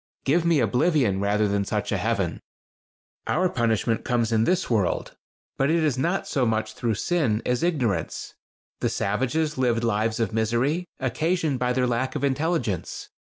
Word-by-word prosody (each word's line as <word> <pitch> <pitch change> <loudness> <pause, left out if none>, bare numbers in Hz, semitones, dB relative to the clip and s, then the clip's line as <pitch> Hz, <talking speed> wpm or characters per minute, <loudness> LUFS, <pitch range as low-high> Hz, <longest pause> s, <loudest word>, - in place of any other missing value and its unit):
Give 160 +5 +3
me 170 -3 +4
oblivion 125 - +2
rather 105 +1 +2
than 100 0 0
such - - -2
a - - +1
heaven. - - -1 0.9
"Our 185 +3 +2
punishment 115 - 0
comes 120 -2 0
in 110 0 +3
this 180 +4 +1
world; 105 -7 0 0.4
but 135 +2 +2
it 165 0 +2
is 150 -5 +2
not 170 +9 -1
so 135 - 0
much 110 -2 0
through 115 -1 -1
sin 130 - 0
as 125 -1 0
ignorance. 125 - -1 0.5
The - - 0
savages 130 +8 -1
lived 120 -2 +1
lives 110 0 0
of 115 -2 -1
misery, 120 +10 0
occasioned 150 +2 0
by 125 0 +1
their 125 0 +1
lack 125 +2 -1
of 145 - -3
intelligence. 140 - -1
125 Hz, 160 wpm, -25 LUFS, 110-155 Hz, 0.9 s, me